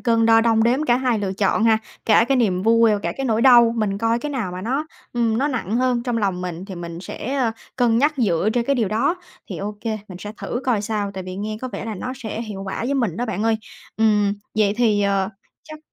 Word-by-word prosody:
cân 230 -1 +2
đo 225 0 +6
đong 225 -1 +3
đếm 240 +4 +3
cả 240 0 +4
2 250 -4 +1
lựa 195 -2 -2
chọn 200 +3 +1
ha, 220 -1 +4 0.3
cả 220 0 +5
cái 275 - +3
niềm 190 -7 +1
vui 230 0 +4
và 205 - +1
cả - - -3
cái 270 -1 -2
nỗi 225 0 +1
đau, 240 -3 +7
mình 200 -2 -1
coi 230 +1 +1
cái 295 +4 -4
nào 225 -10 -3
mà 185 +1 -6
nó, 270 +7 -1 0.3
ừm, 230 -2 +1
nó 285 +2 +1
nặng 230 -5 -2
hơn 250 -1 +1
trong 240 -2 -1
lòng 190 -4 -1
mình 180 0 -5
thì 195 -2 -8
mình 170 -1 -7
sẽ, 255 +7 -5
ơ, 255 -4 +1 0.3
cân 235 -2 +3
nhắc 295 +3 +2
dựa 200 -5 +1
trên 240 - +1
cái 280 +3 +1
điều 225 -6 0
đó. 225 - +1 0.4
Thì - - -4
ô 205 +1 -5
kê, 220 -2 -2
mình 180 -2 -9
sẽ 210 +2 -7
thử 240 - -4
coi 230 -5 +1
sao, 210 -2 -2
tại 190 - -5
vì 185 0 -7
nghe 215 +2 -4
có 255 - -4
vẻ - - -6
là 225 - -4
nó 250 +6 -5
sẽ 225 0 -4
hiệu 205 -3 -6
quả 190 - -3
với 280 - 0
mình 230 - 0
đó 245 - -2
bạn 205 0 -3
ơi. 225 -1 +2 0.4
Ừm, 210 -2 +3 0.2
vậy 205 -1 +3
thì, 215 -4 +2
ờ, 195 -1 +1 0.4
chắc 310 -1 -10
225 Hz, 265 wpm, -21 LUFS, 200-240 Hz, 0.4 s, đau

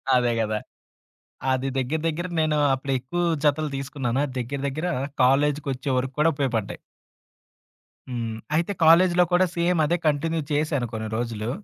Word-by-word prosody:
అదే 125 -1 +3
గదా! 110 -1 0 0.9
అది 130 +1 0
దెగ్గర, 135 +5 -1
దెగ్గర 165 +3 -2
నేను 155 -1 +1 0.2
అప్పుడు 135 +1 -2
ఎక్కువ 175 +8 -3 0.2
జతలు 150 +1 +2
తీసుకున్నాను. 135 -2 -2 0.2
దెగ్గర, 125 +3 -3
దెగ్గర 155 +6 -3 0.3
కాలేజుకొచ్చే 140 +1 +2
వరకు 130 +1 -2
కూడా 155 +2 +5
ఉపయోపడ్డయి. 120 -7 -2 1.3
హ్మ్. 115 -3 -3 0.2
అయితే 170 +5 +1
కాలేజీలో 175 +2 +6
కూడా 180 +1 +5
సేమ్ 170 0 +1
అదే 175 +4 +1
కంటిన్యూ 160 +2 0
చేశాను, 145 -4 0
కొన్ని 110 0 -3
రోజులు. 115 -2 -3
140 Hz, 135 wpm, -24 LUFS, 125-160 Hz, 1.3 s, కాలేజీలో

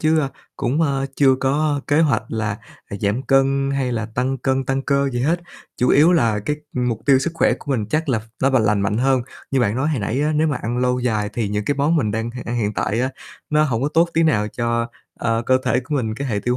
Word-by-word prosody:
chứ, 155 +1 +3
ơ, 145 -3 +1 0.3
cũng 135 +2 -1 0.4
chưa 135 -2 +5
có 145 +2 +1
kế 145 +2 +3
hoạch 145 -10 +2
là, 105 -2 -2 0.3
à, 100 - -6
giảm 105 +5 0
cân 135 0 +2
hay 135 -2 -1
là 115 -2 -2
tăng 130 +2 -1
cân, 130 +1 0
tăng 135 0 -1
cơ 140 0 +1
gì 120 -1 -2
hết, 165 +7 +1 0.4
chủ 125 - +1
yếu 160 +5 +5
là 115 -10 +2
cái 150 +9 -2 0.2
mục 125 -3 -1
tiêu 135 -2 +6
sức 165 +5 -1
khỏe - - +3
của 145 - -8
mình 110 -5 -1
chắc 155 -1 0
là 120 - +2
ph 110 - -11 0.2
nó 135 - +4
và 130 - +4
lành 105 -1 +2
mạnh 100 +2 0
hơn. 130 0 +2 0.3
Như 135 - +2
bạn 105 -3 +1
nói 145 +4 0
hồi 155 -4 0
nãy 110 +6 -1
á, 155 +1 +1
nếu 155 +1 +2
mà 145 - -1
ăn 120 0 -3
lâu 125 0 +1
dài 110 -4 0
thì 115 -4 -2
những 105 0 -2
cái 145 - 0
món 145 +4 +2
mình 115 -9 +1
đang 110 +2 -2
h - - -16
ăn 120 - -3
hiện 105 -3 0
tại 105 +4 -1
á, 130 +1 0 0.4
nó 150 0 +4
hổng 125 -5 -1
có 140 - +1
tốt 165 +3 +3
tí 165 - +3
nào 110 -10 +2
cho, 115 0 -1 0.3
ờ, 115 0 0
cơ 130 0 +4
thể 125 0 +2
của 145 +4 -5
mình, 110 -5 -1
cái 140 +5 -4
hệ 105 -4 0
tiêu 125 +4 0
130 Hz, 270 wpm, -21 LUFS, 115-140 Hz, 0.4 s, tiêu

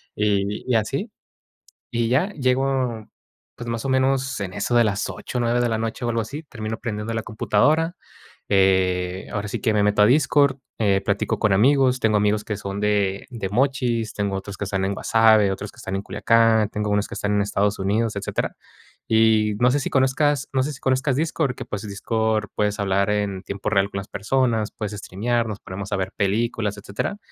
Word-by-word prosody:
y, 105 -1 0
y - - +3
así. 135 - -1 0.8
Y 115 -1 0
ya, 145 +10 +2
llego, 130 -4 0 0.5
pues, 120 - -8
más 115 +1 -3
o 135 - -1
menos, 130 0 +1
en 95 -1 -4
eso 100 +4 -2
de 120 - +6
las 105 -1 -1
8, 125 - -5
9 120 +1 +1
de 120 - +2
la 110 - 0
noche 115 +2 -3
o - - 0
algo 115 -1 0
así, 145 +8 -7
termino 110 -5 -5
prendiendo 110 -1 -4
la 115 -1 -2
computadora, 120 - +1 0.5
eh, 95 -1 +2
ahora 105 0 -2
sí, - - -3
que 110 - +1
me 105 -1 +2
meto 105 0 +3
a - - +7
Discord, 140 +1 +3 0.2
eh, 100 -3 +2
platico 100 0 0
con 105 - +2
amigos, 130 +3 +4
tengo 110 -1 +2
amigos 105 +1 +1
que 105 - -3
son 100 0 -5
de 100 -2 0
de 115 -6 -5
Mochis, 120 -2 0
tengo 100 -1 -2
otros 100 +1 -7
que - - -4
están 95 0 -1
en 100 - -1
Guasave, 110 -1 +4
otros 100 +2 -5
que - - -23
están 95 - -5
en 95 - -2
Culiacán, 115 -1 +3
tengo 105 0 -3
unos 105 0 +1
que - - -7
están 105 0 -1
en 105 - +3
Estados 100 0 0
Unidos, 105 +3 0
etcétera. 100 - -3 0.5
Y, 110 -1 +3
no 125 - +4
sé, 145 - +1
si 135 - -3
conozcas 135 +1 +2
no 130 -1 +2
se 150 - -2
si 135 - -11
conozcas 130 +1 +1
Discord, 155 -4 0
que, - - -7
pues, 105 -1 -5
Discord, 110 +2 -1
puedes 105 0 0
hablar 100 0 +1
en 100 -2 -1
tiempo 100 +1 -4
real 100 -1 +2
con - - -5
las 95 - -8
personas, 115 0 0
puedes 105 -1 -5
streamear, 115 +5 -1
nos 105 -2 -5
ponemos 100 +2 -7
a - - +1
ver 95 0 -3
películas, 105 0 0
etcétera, 100 - -4
110 Hz, 205 wpm, -23 LUFS, 100-125 Hz, 0.8 s, a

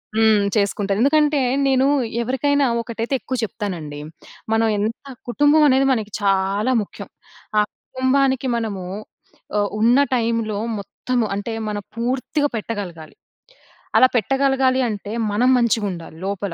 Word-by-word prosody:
హ్మ్. 220 -2 +4
చేసుకుంటారు. 200 -1 0
ఎందుకంటే 295 +1 +3 0.3
నేను 265 0 +3 0.4
ఎవరికైనా 275 +3 +1 0.2
ఒకటైతే 230 +2 -4
ఎక్కువ 255 0 -4
చెప్తానండి. 180 -9 -5 0.5
మనం 225 0 +3
ఎంత 215 +2 0 0.4
కుటుంబం 290 +4 +4
అనేది 265 0 +4
మనకి 215 -4 -3
చాలా 195 +3 +1
ముఖ్యం. 200 - -9 0.5
ఆ - - +6 0.2
కుటుంబానికి 265 0 +1
మనము 210 -5 -3 0.7
ఆహ్, 205 0 +1
ఉన్న 240 +4 +4 0.2
టైంలో 230 -3 -1 0.2
మొత్తము 235 +4 -2
అంటే 205 +3 -4 0.2
మనం 205 -1 -3
పూర్తిగా 260 +5 -1
పెట్టగలగాలి. 195 -8 -6 0.8
అలా 255 - +7
పెట్టగలగాలి 265 +2 +2
అంటే 205 0 -5 0.2
మనం 245 +5 +2
మంచిగా 225 -3 +1
ఉండాలి. 165 -2 -9
లోపల 200 -2 -3
225 Hz, 120 wpm, -21 LUFS, 205-260 Hz, 0.8 s, అలా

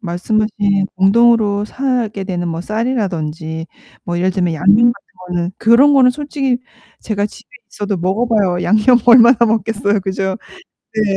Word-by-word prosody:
말씀하신 200 +1 -1
공동으로 210 +1 +3
사게 240 -5 -3
되는 175 -2 -4
뭐 165 0 -4
쌀이라든지 175 -8 -3 0.4
뭐 175 0 -4
예를 185 +2 +1
들면 180 -3 -1
양념 205 +8 +3
같은 - - -19 0.3
거는 175 0 -2
그런 255 +6 +4
거는 255 -2 +5
솔직히 275 -2 -3 0.4
제가 205 -2 -2
집에 225 +2 -16 0.2
있어도 205 -1 -4
먹어봐야 190 0 0
양념 215 +5 +3
얼마나 240 +1 +7
먹겠어요. 215 -1 -1
그죠? 190 0 -3 0.6
네. 220 - -1
210 Hz, 315 characters per minute, -16 LUFS, 185-235 Hz, 0.6 s, 얼마나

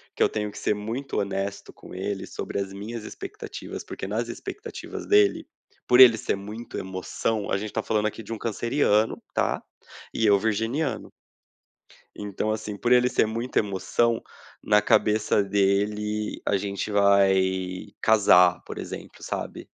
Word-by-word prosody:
que - - +3
eu - - +4
tenho 105 -1 -2
que - - -12
ser - - +1
muito 115 +7 -4
honesto 100 0 -3
com - - -13
ele 95 +1 -3
sobre 100 - -5
as 95 0 -5
minhas 105 +3 -6
expectativas, - - -7
porque 95 - -6
nas 115 +3 -2
expectativas 415 - -7
dele, 410 -1 +4 0.4
por 125 +1 +4
ele 120 -4 +10
ser 100 - -1
muito 105 +4 -8
emoção, 95 +3 -3
a - - +2
gente 110 +2 -4
está 110 - -2
falando 105 -1 0
aqui 110 +1 -3
de 110 - -10
um 115 - -3
canceriano, 115 -1 +1
tá, - - 0 0.5
e 115 - +1
eu 100 -1 +5
virginiano. 115 +8 -1 1.0
Então, 105 +1 -3
assim, 105 -1 -4
por 120 +3 -1
ele 125 0 +5
ser - - +2
muita 115 +3 -1
emoção, 110 +3 0 0.4
na 105 0 +4
cabeça 105 -1 +3
dele 105 +2 0
a 100 - +2
gente 100 +1 -3
vai 95 -2 +2
casar, 90 -5 +5
por - - -8
exemplo, - - -7
sabe. - - -5
105 Hz, 155 wpm, -25 LUFS, 100-115 Hz, 1.0 s, ele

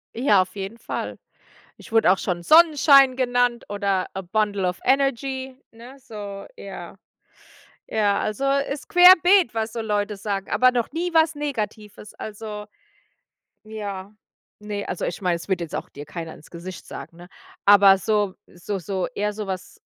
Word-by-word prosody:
Ja, 225 -6 +4
auf 185 - -5
jeden 195 +3 -6
Fall. - - -5 0.6
Ich - - -15
wurde 225 -5 +4
auch 190 - +2
schon 175 -2 -3
Sonnenschein 280 - +6
genannt 245 -2 0
oder 200 -2 -1
a 190 - -4
bundle 200 0 -1
of 180 - -3
energy, 265 0 0
ne? 240 +4 -13
So, 205 -6 -8
ja. 195 -2 -9 0.9
Ja, 205 -2 +1
also, 215 +6 -2
ist 280 +2 -2
querbeet, 360 - +6
was 220 -1 -2
so 230 -1 -4
Leute 210 -1 -2
sagen. 195 -1 -4
Aber 250 +5 +4
noch 240 -2 -2
nie 345 +2 -3
was 320 -1 +3
negatives, 215 -7 -5
also 210 -1 -7 1.0
ja. 205 -2 -7 0.5
Ne, 210 -1 -5
also, 180 - -3
ich 175 - -4
meine, 180 -2 +1
es 170 - -10
wird 190 -2 0
jetzt 170 -2 -6
auch - - -6
dir 145 +1 -10
keiner 165 +1 -7
ins 150 - -17
Gesicht 180 +1 -9
sagen, 150 +4 -9
ne? 175 - -13 0.4
Aber 200 -1 +7
so 205 -2 0
so 195 +3 -6
so 190 0 -3
eher 210 +1 -1
sowas 200 - -6
210 Hz, 160 wpm, -23 LUFS, 195-255 Hz, 1.0 s, Aber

